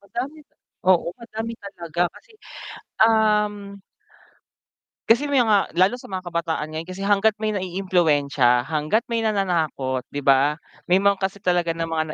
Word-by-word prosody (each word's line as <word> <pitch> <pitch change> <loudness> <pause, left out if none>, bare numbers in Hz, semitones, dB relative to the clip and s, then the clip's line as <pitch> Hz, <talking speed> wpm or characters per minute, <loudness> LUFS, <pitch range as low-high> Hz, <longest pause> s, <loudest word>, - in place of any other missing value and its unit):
Madami 245 +9 -6 0.5
oo, 180 - +3
madami 225 0 -6
talaga 175 -4 -4
kasi, - - -18 0.8
um 210 -1 +2 1.6
kasi 255 +6 +4
may 275 -3 +3
mga 210 -3 +1
lalo 185 +6 +3
sa - - -12
mga 185 -1 -5
kabataan 165 -2 -2
ngayon 160 +1 -5
kasi 185 +1 -7
hangga't 205 +2 +3
may 215 - +1
naiimpluwensya, 160 -10 +1
hangga't 155 +9 +1
may 230 - 0
nananakot 170 - -1
'di 145 - -3
ba? 140 +2 +4 0.3
May 185 +2 +3
mga 200 -1 +3
kasi 195 +1 -3
talaga 175 -2 +1
ng 165 0 -4
mga 160 -1 0
185 Hz, 145 wpm, -22 LUFS, 160-210 Hz, 1.6 s, kasi